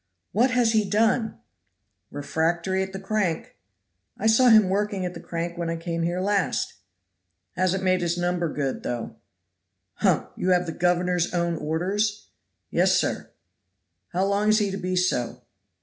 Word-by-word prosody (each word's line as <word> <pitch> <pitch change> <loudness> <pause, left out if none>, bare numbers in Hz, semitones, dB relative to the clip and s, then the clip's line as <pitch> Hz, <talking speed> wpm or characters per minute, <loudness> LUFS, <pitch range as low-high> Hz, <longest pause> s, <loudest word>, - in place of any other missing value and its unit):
"What 240 +6 +3
has 245 -3 +2
he 220 -1 +3
done?" 220 +2 +1 0.7
"Refractory 170 +6 -1
at 190 0 -5
crank." 195 -5 -1 0.6
"I 215 - -4
saw 225 +3 +5
him 215 -4 +7
working 200 0 -1
at 180 - -4
the - - -8
crank 170 +1 -5
when 170 -1 -2
I 165 - -1
came 165 0 -3
here 175 +2 -1
last." 200 -1 0 0.8
"Hasn't 185 +1 0
made 185 -1 +2
his 170 0 0
number 175 -2 -1
good, 140 -3 -2
though." 120 -2 -5 0.8
"Humph! - - +1
You 185 - -1
have 180 -1 +3
the 165 - -4
governor's 180 +1 +1
own 170 -1 0
orders?" 190 +7 -1 0.4
"Yes, - - +3
sir." - - -2 0.8
"How 185 - 0
long 200 +2 +1
is 215 - +5
he 205 -2 +1
to 195 - -3
be 185 -1 -2
so?" 180 -10 0
185 Hz, 155 wpm, -25 LUFS, 170-205 Hz, 0.8 s, him